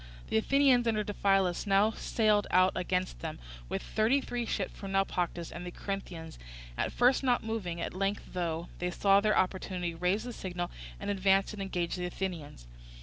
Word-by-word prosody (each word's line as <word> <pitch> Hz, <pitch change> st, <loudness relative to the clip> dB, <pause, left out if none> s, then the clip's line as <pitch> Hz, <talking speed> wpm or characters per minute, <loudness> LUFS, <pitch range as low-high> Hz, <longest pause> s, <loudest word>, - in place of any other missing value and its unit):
The -, -, +2 dB
Athenians 260 Hz, 0 st, +4 dB
under 215 Hz, -2 st, +2 dB
Diphilus 195 Hz, -2 st, +1 dB
now 200 Hz, +2 st, +4 dB
sailed 215 Hz, -2 st, +1 dB
out 185 Hz, +1 st, +5 dB
against 180 Hz, -, -1 dB
them -, -, -5 dB, 0.3 s
with -, -, -2 dB
thirty 225 Hz, +6 st, +2 dB
three 245 Hz, -3 st, -3 dB
ships 195 Hz, -4 st, -2 dB
from 195 Hz, -1 st, -6 dB
Naupactus, 180 Hz, -3 st, 0 dB
and 170 Hz, -, -7 dB
the 180 Hz, -, -5 dB
Corinthians, 175 Hz, -4 st, -6 dB, 0.4 s
at -, -, -1 dB
first 250 Hz, +2 st, +4 dB
not 250 Hz, -2 st, +2 dB
moving, 205 Hz, -7 st, -3 dB
at -, -, -3 dB
length 195 Hz, +2 st, -1 dB
thought 170 Hz, -1 st, -2 dB
they 180 Hz, -, -1 dB
saw 195 Hz, +2 st, +4 dB
their 215 Hz, +1 st, +2 dB
opportunity, 185 Hz, -2 st, -1 dB
raised 180 Hz, +6 st, 0 dB
the 245 Hz, -, -5 dB
signal, 175 Hz, -3 st, -4 dB, 0.3 s
and -, -, -2 dB
advanced 195 Hz, +1 st, +2 dB
and 205 Hz, -, -6 dB
engaged 180 Hz, -2 st, -2 dB
the 180 Hz, -, -1 dB
Athenians. 170 Hz, -, -5 dB
195 Hz, 175 wpm, -31 LUFS, 180-215 Hz, 0.4 s, out